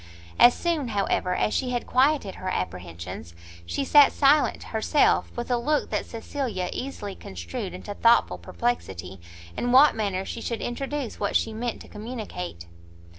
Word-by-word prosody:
As 240 0 +8
soon, 330 -6 -1
however, 200 -4 0
as 215 - 0
she 255 - 0
had 245 -1 -2
quieted 260 -6 +2
her 185 - -5
apprehensions, 85 - -5 0.3
she 275 - -2
sat 290 0 +7
silent 290 +1 +3
herself, 225 +7 +2
with 240 +1 -3
a 245 - +3
look 295 +5 0
that - - -1
Cecilia 230 -6 -4
easily 230 -7 -5
construed 85 - -6
into 95 - -7
thoughtful 230 +3 +3
perplexity 95 - -3 0.3
in 245 - -1
what 275 +4 +7
manner 195 -3 -1
she 230 - -6
should 230 -1 -3
introduce 275 0 -4
what 205 - -1
she 225 - +1
meant 235 +1 -4
to - - -15
communicate. 210 - -7
230 Hz, 155 wpm, -26 LUFS, 180-260 Hz, 0.3 s, As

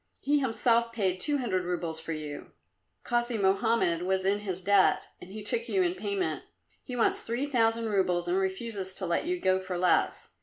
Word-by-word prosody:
He 290 +1 +2
himself 235 -2 +2
paid 190 -5 -1
two 295 +5 +3
hundred 200 -9 -1
roubles 170 -2 -3
for 165 - -6
you. 150 -2 -6 0.5
Kasi 240 -1 0
Mohammed 195 -3 +2
was 190 +1 0
in 200 +2 +2
his 190 -3 -5
debt, 200 0 +4 0.2
and 180 - -11
he 215 +1 -7
took 465 - -1
you 380 -2 +2
in 350 -1 +1
payment. 390 0 -2 0.4
He 250 - -6
wants 235 - +2
three 240 +4 -2
thousand 230 -4 +1
roubles 180 -4 +1
and 175 - +1
refuses 190 0 -3
to 190 - -4
let 170 - 0
you 360 0 -1
go 185 - +2
for 185 -1 -4
less. 180 0 +1
205 Hz, 190 wpm, -29 LUFS, 185-240 Hz, 0.5 s, debt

